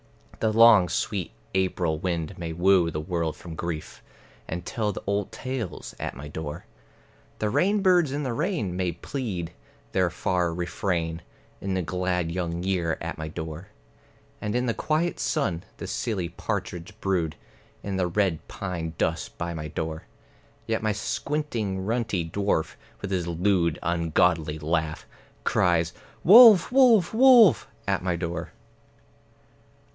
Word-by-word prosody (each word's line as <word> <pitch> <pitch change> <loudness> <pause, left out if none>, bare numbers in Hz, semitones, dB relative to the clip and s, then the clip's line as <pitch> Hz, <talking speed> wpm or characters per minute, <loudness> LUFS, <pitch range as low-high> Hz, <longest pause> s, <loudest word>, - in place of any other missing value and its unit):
The 110 - +1
long 110 -5 +7
sweet 90 +2 -2 0.2
April 90 -4 0
wind 85 0 -2
may 85 -2 -5
woo 90 0 +4
the 75 - -4
world 85 -1 -2
from 85 - -9
grief, 80 -1 -5 0.5
And 85 +1 -5
tell 110 -3 -1
the - - -7
old 100 -1 -1
tales 130 -8 -5
at - - -4
my 70 +4 -8
door; 75 0 -6 0.7
The 105 -1 -1
rainbirds 185 - +3
in 145 +2 -2
the 130 -3 -2
rain 115 - -1
may 90 -2 -1
plead 90 - -4 0.4
their 95 -2 +2
far 90 0 0
refrain, 85 -1 -2 0.4
In 95 -1 -2
the 95 - 0
glad 90 -1 -1
young 85 -1 -3
year 90 -4 0
at - - -5
my 80 - -4
door; 80 +2 -6 0.7
And 105 +1 -2
in 125 +1 +1
the 115 - +1
quiet 160 +7 -1
sun, 95 -6 -1
the - - -6
silly 95 -7 -2
partridge 90 +6 -5
brood 90 -7 0 0.5
In 100 -1 -3
the 90 -1 +1
red 90 -2 0
pine 85 -4 -5
dust 80 0 -2
by 85 0 -3
my 75 -2 -5
door; 80 +1 -4 0.6
Yet 110 0 -1
my 110 -1 +1
squinting 110 -4 -2
runty 110 -6 -1
dwarf, 100 -2 0 0.3
with 100 - -4
his 90 -3 -1
lewd 85 -1 +1
ungodly 85 -2 +1
laugh, 80 0 -2 0.4
Cries 85 -2 +2 0.3
"Wolf, 215 0 +9
wolf, 240 -9 +5
wolf!" 240 - +7 0.2
at 100 -1 +1
my 90 -1 0
door. 85 -1 -4
90 Hz, 140 wpm, -26 LUFS, 85-110 Hz, 0.7 s, Wolf